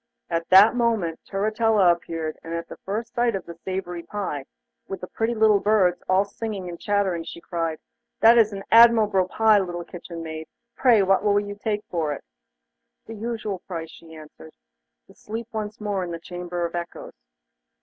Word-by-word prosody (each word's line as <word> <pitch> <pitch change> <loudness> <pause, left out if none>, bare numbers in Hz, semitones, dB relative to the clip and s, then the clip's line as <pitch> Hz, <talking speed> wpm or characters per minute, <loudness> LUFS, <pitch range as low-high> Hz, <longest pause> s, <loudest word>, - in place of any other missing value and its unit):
At 165 0 -2
this 200 +4 +8
moment 225 -9 0
Turritella 210 -1 +3
appeared, 165 -2 -4
and 165 +1 -5
at 170 0 -4
the - - -10
first 225 +4 -5
sight 240 -2 +1
of 195 - -5
the 170 - -8
savoury 175 0 -5
pie, 170 -8 -4 0.4
with 195 -2 -6
the - - -4
pretty 225 +5 -2
little 215 -2 +4
birds 195 -4 +2
all 190 +2 +4
singing 200 -2 -5
and 170 -1 -7
chattering, 200 -5 0
she 170 - -9
cried: 165 -2 -3 0.4
'That 230 +1 +7
is 215 -1 +4
an 195 -1 -6
admirable 220 -5 +6
pie, 220 +2 +4
little 175 -2 -4
kitchen 170 -1 -8
maid. 160 0 -7 0.3
Pray 235 -6 +4
what 195 +1 +3
will 205 -1 +3
you 205 0 -5
take 210 0 -3
for 160 -4 -1
it?' - - -9 0.8
'The 225 - -8
usual 220 -3 -4
price,' 165 -3 -7
she 160 -1 -14
answered. 155 0 -13 0.5
'To - - -19
sleep 225 +2 -7
once 215 -1 -5
more 205 -3 -2
in 175 - -5
the 170 -1 -5
Chamber 175 0 -4
of 170 - -5
Echoes. 170 0 -6
195 Hz, 180 wpm, -24 LUFS, 170-215 Hz, 0.8 s, this